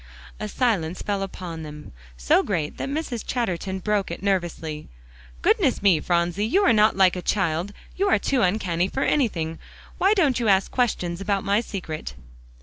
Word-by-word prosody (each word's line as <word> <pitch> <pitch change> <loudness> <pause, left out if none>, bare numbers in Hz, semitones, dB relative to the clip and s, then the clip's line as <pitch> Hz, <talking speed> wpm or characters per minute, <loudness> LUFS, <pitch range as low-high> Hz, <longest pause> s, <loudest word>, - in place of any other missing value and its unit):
A 215 - -3
silence 195 -8 -1
fell 200 -1 -1
upon 180 -4 -6
them, 150 -1 -9 0.3
so - - +3
great 165 -7 -2
that - - -4
Mrs. 280 -6 -3
Chatterton 190 -6 -2
broke 205 +1 -1
it 170 - -6
nervously. 170 -5 -2 0.5
"Goodness - - +2
me, 185 -6 +5
Phronsie, 175 +4 0
you 390 - +3
are - - +5
not 215 -1 +4
like 190 -2 +5
a 180 - -4
child; 180 -1 0 0.2
you 395 +2 +1
are - - +5
too 270 -3 0
uncanny 180 -3 +1
for 270 - -2
anything. 165 - 0 0.4
Why 395 +3 +4
don't 295 -10 +2
you 235 - 0
ask 195 -1 +3
questions 185 -8 -1
about 195 -1 0
my 200 +1 +2
secret?" 180 -9 -6
195 Hz, 170 wpm, -24 LUFS, 170-220 Hz, 0.5 s, me